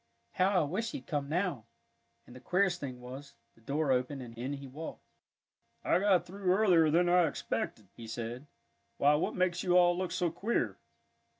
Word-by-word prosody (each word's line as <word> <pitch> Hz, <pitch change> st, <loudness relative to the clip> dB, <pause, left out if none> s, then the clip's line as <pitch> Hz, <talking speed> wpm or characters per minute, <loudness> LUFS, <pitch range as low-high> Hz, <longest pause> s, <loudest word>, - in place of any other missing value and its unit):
"How 185 Hz, 0 st, +2 dB
I -, -, +2 dB
wish 215 Hz, +10 st, -2 dB
he'd 285 Hz, -, -6 dB
come 145 Hz, -3 st, -2 dB
now," 165 Hz, -, -1 dB, 0.6 s
and 125 Hz, -, -14 dB
the -, -, -10 dB
queerest 180 Hz, +3 st, +1 dB
thing 130 Hz, -4 st, -6 dB
was, 130 Hz, +3 st, -9 dB, 0.2 s
the 115 Hz, -, -25 dB
door 140 Hz, +4 st, 0 dB
opened, 130 Hz, +1 st, 0 dB
and 115 Hz, -1 st, -10 dB
in 125 Hz, +4 st, -4 dB
he 140 Hz, -1 st, -7 dB
walked. 145 Hz, +5 st, -8 dB, 0.8 s
"I -, -, +3 dB
got 195 Hz, -2 st, +3 dB
through 190 Hz, 0 st, -1 dB
earlier 180 Hz, -5 st, +4 dB
than 175 Hz, +3 st, +3 dB
I 175 Hz, -1 st, +5 dB
expected," 110 Hz, -7 st, -4 dB
he 115 Hz, -, -9 dB
said. 120 Hz, +4 st, -5 dB, 0.5 s
"Why, 145 Hz, +1 st, +4 dB
what 150 Hz, -, 0 dB
makes 180 Hz, -1 st, +1 dB
you 180 Hz, -1 st, +3 dB
all 175 Hz, -1 st, +5 dB
look 185 Hz, 0 st, -2 dB
so 175 Hz, -2 st, 0 dB
queer?" 160 Hz, -, -1 dB
160 Hz, 185 wpm, -31 LUFS, 130-180 Hz, 0.8 s, I